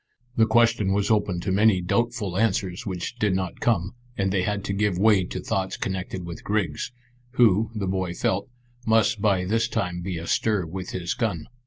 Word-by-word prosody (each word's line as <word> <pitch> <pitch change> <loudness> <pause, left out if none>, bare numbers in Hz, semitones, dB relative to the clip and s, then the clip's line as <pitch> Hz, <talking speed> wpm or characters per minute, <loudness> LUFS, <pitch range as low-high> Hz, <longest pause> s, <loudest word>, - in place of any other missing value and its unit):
The 110 -1 +4
question 115 -3 +3
was 100 +2 +1
open 100 -5 +1
to 95 - -2
many 100 0 +4
doubtful 105 +1 -1
answers 95 -3 0
which 95 +5 -4
did 105 -4 +2
not 95 -2 -3
come, 100 -5 +1 0.2
and 95 -1 +1
they 95 -1 +1
had 105 +1 -1
to 100 - -2
give 100 -2 +1
way 100 -1 +4
to - - -5
thoughts 95 0 -2
connected 95 -1 -4
with 85 -1 -8
Griggs, 100 -3 -1 0.4
who, 110 -3 +4
the 105 -2 -2
boy 95 -2 -2
felt, 100 +5 -1 0.4
must 110 -1 +3
by 95 -4 +2
this 115 +4 +1
time 90 -6 -2
be 90 -1 -3
astir 90 +3 0
with 90 +3 -6
his 90 -1 -2
gun. 110 - -2
95 Hz, 185 wpm, -25 LUFS, 90-110 Hz, 0.4 s, The